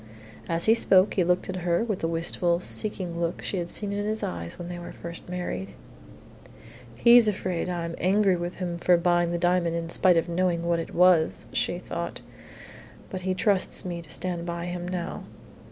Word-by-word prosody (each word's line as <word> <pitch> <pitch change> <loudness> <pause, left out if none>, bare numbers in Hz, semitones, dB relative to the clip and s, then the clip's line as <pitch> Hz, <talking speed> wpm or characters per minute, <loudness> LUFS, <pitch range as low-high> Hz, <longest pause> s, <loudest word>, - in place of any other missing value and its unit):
As 165 0 +1
he 220 - +6
spoke 195 -4 +4
he 185 - +2
looked 180 +1 +1
at 185 - -4
her 175 +2 +1
with 215 -5 -2
the 165 - -1
wistful, 170 +1 0
seeking 180 -3 -2
look 170 0 -2
she 195 - -3
had 175 -1 -3
seen 205 +2 -3
in 205 0 -2
his 215 +1 -2
eyes 85 -1 -4
when 175 - -7
they 175 0 -6
were 175 - -8
first 170 +1 -7
married. 100 - -4 1.2
"He's 235 - +7
afraid 185 -4 -1
I'm 170 -1 -3
angry 195 +1 +3
with 175 0 -4
him 175 -2 -4
for 175 0 +4
buying 175 0 +2
the 175 - -1
diamond 175 -1 +1
in 165 0 -3
spite 180 -1 +4
of 165 - +1
knowing 170 0 0
what 170 0 +1
it 165 - -6
was," 175 -2 +4
she 175 - 0
thought, 170 -1 -5 0.9
"but 185 - -4
he 185 0 -1
trusts 200 -2 +1
me 175 -2 -4
to 165 - -13
stand 175 0 -3
by 170 0 -4
him 175 0 -4
now." 180 -2 -4
175 Hz, 195 wpm, -26 LUFS, 170-185 Hz, 1.2 s, He's